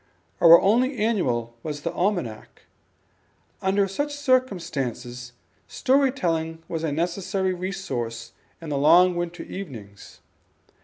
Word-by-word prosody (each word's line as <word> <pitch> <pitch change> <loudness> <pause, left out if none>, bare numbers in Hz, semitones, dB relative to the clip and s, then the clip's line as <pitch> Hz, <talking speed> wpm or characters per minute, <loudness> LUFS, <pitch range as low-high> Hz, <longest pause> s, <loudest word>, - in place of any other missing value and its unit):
Our 170 0 +9
only 250 +6 +2
annual 130 - 0
was 150 0 -5
the - - -3
Almanac. 175 - -3 1.0
Under 195 +1 +2
such 290 +9 -3
circumstances 140 - -2 0.3
story 270 0 +2
telling 165 -8 -2
was 165 -1 -4
a 160 - -1
necessary 185 +4 -1
resource 120 -12 -5 0.3
in 165 - -8
the 140 -2 -1
long 175 +5 +5
winter 175 0 -4
evenings. 115 - -10
175 Hz, 110 wpm, -24 LUFS, 140-195 Hz, 1.0 s, Our